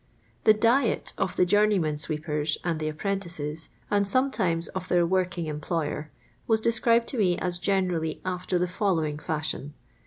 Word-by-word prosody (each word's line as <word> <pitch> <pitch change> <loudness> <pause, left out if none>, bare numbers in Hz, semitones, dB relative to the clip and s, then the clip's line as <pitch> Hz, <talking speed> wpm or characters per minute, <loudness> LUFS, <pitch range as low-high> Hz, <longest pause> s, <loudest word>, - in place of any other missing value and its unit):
The 215 - +8
diet 230 +2 +2
of 185 - -1
the 180 - +4
Journey/men 200 -4 +3
srt' 150 0 -3
pers 150 -1 -1
and 170 -3 -1
the 155 0 -1
apprentices, 160 -3 -4 0.2
and 205 -1 +2
sometimes 200 -9 +2
of 185 -1 -5
their 175 -1 +3
working 180 -2 0
em 150 -1 -4
ployer, 155 -2 -2 0.4
was 225 -1 +3
described 230 +1 +3
to 255 - -3
me 180 -4 +3
as 175 -1 -1
generally 180 -5 0
after 180 0 -1
the 180 +1 +1
following 170 -6 0
fashion. 150 -2 -3
180 Hz, 160 wpm, -27 LUFS, 155-200 Hz, 0.4 s, The